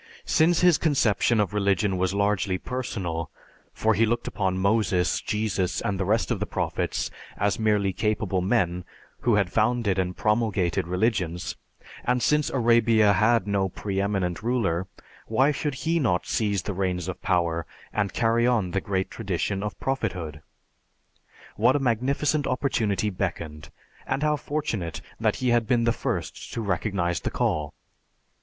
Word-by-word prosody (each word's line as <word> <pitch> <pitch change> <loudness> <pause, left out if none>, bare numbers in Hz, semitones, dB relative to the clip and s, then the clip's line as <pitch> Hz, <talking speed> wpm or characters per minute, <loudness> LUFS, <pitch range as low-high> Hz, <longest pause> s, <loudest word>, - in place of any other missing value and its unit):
"Since 170 +1 +3
his 180 -3 +5
conception 120 - +2
of 105 -1 0
religion 100 -1 +1
was 95 0 0
largely 100 -1 +1
personal, 90 -10 -4 0.4
for 110 0 +1
he 110 +2 +2
looked 120 +1 -1
upon 95 -2 -1
Moses, 100 -2 +1
Jesus, 105 -4 -1
and 100 -2 -2
the 95 - 0
rest 110 +4 +1
of - - 0
the - - -2
prophets - - -2 0.3
as 100 0 0
merely 105 -3 +2
capable 105 -3 0
men 90 -3 +1 0.4
who 120 -3 +2
had 100 -4 +1
founded 110 -3 +1
and 90 -1 -2
promulgated 105 -7 +1
religions; 90 -3 -1 0.5
and 125 0 +1
since 150 0 +2
Arabia 115 -4 +4
had 110 +2 +3
no 100 -2 0
pre 100 +1 -3
eminent 95 -3 -1
ruler, 105 -7 0 0.4
why 130 +6 +3
should 145 -1 -2
he 165 +6 0
not 100 - +1
seize 100 -5 0
the 100 - -3
reins 90 -2 -1
of 95 - -5
power 85 -3 0 0.3
and 100 -2 0
carry 115 0 +2
on 110 -8 +1
the 100 - 0
great 95 -1 -2
tradition 100 -1 -2
of 105 0 -5
prophethood? 85 - -3 1.2
What 120 +6 +4
a - - +2
magnificent 135 +4 +1
opportunity 110 -6 0
beckoned, 85 -5 -4 0.4
and 135 +2 -1
how 150 0 +3
fortunate 140 - -3 0.2
that - - +1
he 130 - 0
had 120 -2 +2
been 120 0 +2
the 115 - +3
first - - -4
to 115 - -2
recognize 90 -3 -1
the - - -2
call! 75 -2 -1
105 Hz, 155 wpm, -26 LUFS, 95-120 Hz, 1.2 s, his